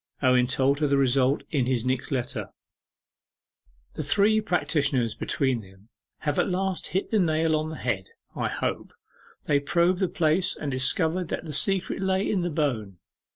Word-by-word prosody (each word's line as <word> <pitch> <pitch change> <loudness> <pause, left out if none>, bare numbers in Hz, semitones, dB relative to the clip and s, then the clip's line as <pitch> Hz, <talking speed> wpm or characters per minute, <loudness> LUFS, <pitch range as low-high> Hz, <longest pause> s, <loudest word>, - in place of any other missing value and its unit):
Owen 125 -1 +4
told 135 +2 +1
her 150 - +2
the 140 0 +2
result 135 0 +2
in 135 -6 +1
his 125 -2 0
next 130 0 -1
letter: 125 -5 -3 1.4
'The - - -4
three 205 +8 +3
practitioners 145 - 0
between 130 -4 -1
them 95 +2 -18 0.3
have 150 -2 -1
at - - +1
last 190 0 -1
hit 190 - -2
the 220 - +3
nail 160 -2 +2
on 155 0 -1
the 160 - -6
head, 100 -9 -3 0.3
I - - -1
hope. - - -3 0.5
They 145 -1 +2
probed 175 +4 +2
the 190 -3 +1
place, 165 +2 +1
and 145 - -4
discovered 160 +7 +1
that - - -4
the 155 - -6
secret 190 +7 +1
lay 190 0 +1
in 195 - 0
the 175 - -1
bone. 125 - -2
150 Hz, 170 wpm, -26 LUFS, 130-175 Hz, 1.4 s, Owen